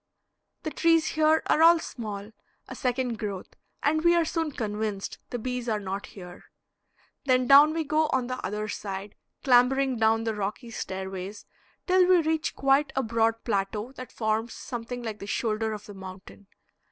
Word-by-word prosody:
The 310 - -3
trees 330 -1 +3
here 315 0 +3
are 310 - +2
all 335 +1 +8
small, 210 -8 -6 0.4
a - - -7
second 250 -2 -2
growth, 200 -3 -5 0.3
and 310 +2 +2
we 345 0 +5
are 340 -1 +3
soon 325 0 -1
convinced 210 -4 -3
the 245 - -3
bees 250 0 -3
are 215 -1 0
not 195 0 -5
here. 180 -2 -12 0.8
Then 255 -2 +3
down 280 +4 +8
we 325 0 -1
go 310 +1 +1
on 260 -2 +1
the 255 +1 -5
other 210 +1 -3
side, 200 -1 -5 0.3
clambering 260 +1 +4
down 225 0 +3
the 225 -1 -1
rocky 210 +4 -4
stairways 190 0 -6 0.4
till 365 -1 +4
we 365 -1 +6
reach 320 +1 -1
quite 275 +2 +2
a 265 - +1
broad 225 0 +1
plateau 210 +2 -2
that 255 -2 -10
forms 220 +1 -1
something 240 0 -6
like 220 -2 -5
the 200 - -8
shoulder 220 +1 -1
of 210 -1 -6
the 205 - -10
mountain. 190 +1 -11
235 Hz, 170 wpm, -27 LUFS, 210-275 Hz, 0.8 s, all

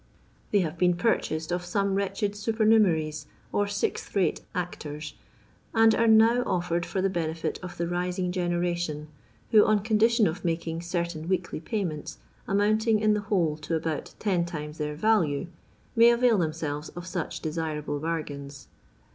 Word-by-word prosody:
They 205 - +3
have 165 -1 -3
been 180 -1 +4
purchased 165 -4 0
of 175 0 -1
some 195 +2 0
wretched 200 +1 -1
supernumeraries, 205 -9 +2 0.2
or 205 0 +1
sixth 205 +1 -3
rate 195 -3 +1
actors, 155 -4 -5 0.6
and 225 0 +6
are 230 - +2
now 225 +2 +6
offered 175 -1 -1
for 190 - -2
the - - +4
benefit 165 -2 -2
of 180 -1 -8
the 170 - -1
rising 180 +1 -1
generation, 175 -4 -1 0.4
who, 215 -2 +7
on 215 -1 +3
condition 225 +1 +3
of 170 +2 -2
making 165 -1 -2
certain 170 -2 -3
weekly 180 -4 -1
payments, 170 -4 -4 0.3
amounting 215 +2 +2
in 215 0 +3
the 210 - 0
whole 175 -7 0
to 160 +1 -2
abont 155 -1 -4
ten 185 -5 +1
times 150 -2 -6
their 150 0 -2
value, 170 -5 +2 0.5
may 230 0 +7
avail 235 -2 +4
them 160 -3 +1
selres 150 -1 -4
of 175 - -6
such 180 -3 -4
desirable 155 -2 -3
bargains. 145 -3 -5
175 Hz, 155 wpm, -27 LUFS, 160-205 Hz, 0.6 s, who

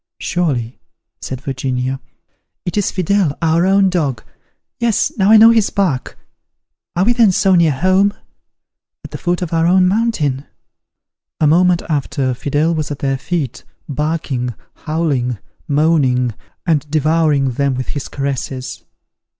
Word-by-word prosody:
"Surely," 135 -10 -2 0.4
said 130 -1 -6
Virginia, 130 -1 -3 0.7
"it 175 - -3
is 205 -2 +1
Fidele, 185 -4 0
our 165 +2 +2
own 195 0 +4
dog: 150 -10 -1 0.6
yes, 235 -3 +1
now 195 0 +2
I 220 - +8
know 225 +1 +8
his 225 -3 +3
bark. 175 -11 -1 0.8
Are 175 - +2
we 240 - +3
then 230 -4 +4
so 190 +1 +2
near 170 -3 +4
home? 185 +8 +2 0.9
at - - -10
the - - -6
foot 175 0 -1
of 170 - -5
our 165 0 +2
own 185 +1 +4
mountain?" 180 - 0 0.9
A 155 - +3
moment 175 +3 +3
after, 140 -3 -1
Fidele 145 +6 0
was 155 -2 -2
at 145 - -4
their 135 -1 -1
feet, 155 -6 -3 0.2
barking, 140 -5 -2 0.2
howling, 145 -7 -2 0.3
moaning, 140 -5 +2 0.3
and 150 -3 0
devouring 155 -2 +2
them 140 +2 0
with 130 0 -4
his 145 - -4
caresses. 135 -2 -4
155 Hz, 140 wpm, -17 LUFS, 135-180 Hz, 0.9 s, I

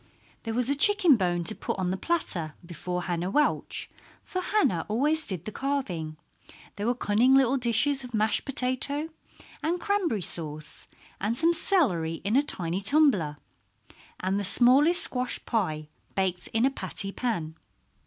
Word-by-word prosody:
There 225 0 -3
was 250 0 0
a - - +2
chicken 365 -1 +5
bone 175 -4 -1
to 190 - +5
put - - -4
on 185 -1 -1
the - - -1
platter 190 - -2
before 180 +1 -5
Hannah 175 0 -2
Welch, 300 +8 0 0.4
for 370 - -4
Hannah 365 - +1
always 295 +8 0
did 180 -4 -3
the 215 - -5
carving. 195 - -3 0.6
There 205 +2 -3
were 245 - +1
cunning 240 +3 +3
little 270 -1 +4
dishes 265 +3 +1
of 250 - -9
mashed 215 0 +1
potato 275 +3 -1 0.5
and 340 +3 -1
cranberry 355 - -1
sauce, 155 -2 -5 0.3
and 215 +4 -2
some 335 +3 +3
celery 230 - 0
in 205 +4 0
a 275 - +5
tiny 180 - -4
tumbler, 200 - +2 0.8
and 190 +2 -1
the - - -3
smallest 265 - +5
squash 250 -1 -1
pie 155 -9 -2 0.3
baked 185 -2 -1
in 225 +2 +1
a 270 - +2
patty 200 -6 -2
pan. 175 -10 -3
225 Hz, 155 wpm, -27 LUFS, 180-285 Hz, 0.8 s, chicken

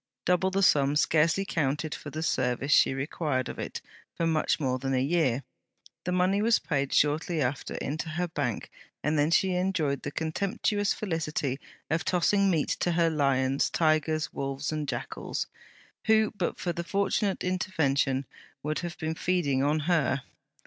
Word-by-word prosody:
Double 180 +1 +3
the 195 +1 0
sum 140 -4 +4
scarcely 165 +5 +3
counted 150 -1 -1
for 150 - -7
the 155 +2 -4
service 125 -1 0
she - - +6
required 140 -1 -1
of - - -7
it - - -5 0.3
for 165 - 0
much 160 -2 +1
more 130 -3 0
than 135 +1 -1
a - - +2
year. 140 -3 +1 0.6
The 180 - -1
money 185 +3 +2
was 225 +1 +4
paid 140 -3 -1
shortly 155 +3 +2
after 130 -1 -2
into 160 +3 -3
her 175 +3 -1
Bank, 145 -8 -3 0.3
and 150 +2 +1
then 145 0 +3
she 190 +3 +3
enjoyed 180 -6 0
the - - -4
contemptuous 200 +6 -1
felicity 155 -8 -2 0.3
of 165 +2 +1
tossing 195 +2 +2
meat 160 -5 +1
to 175 - +1
her 165 -1 +3
lions, 135 -2 +2
tigers, 155 -1 +1
wolves, 135 +2 -3
and 155 -1 -3
jackals, - - -3 0.6
who, 220 0 +4
but 180 -4 -2
for 175 - -2
the 170 - -4
fortunate 200 +1 0
intervention, 145 -8 0 0.4
would 155 +1 -1
have 175 -1 -5
been 160 0 -2
feeding 160 -6 0
on 150 +2 +2
her. 150 -5 +1
155 Hz, 165 wpm, -28 LUFS, 140-180 Hz, 0.6 s, she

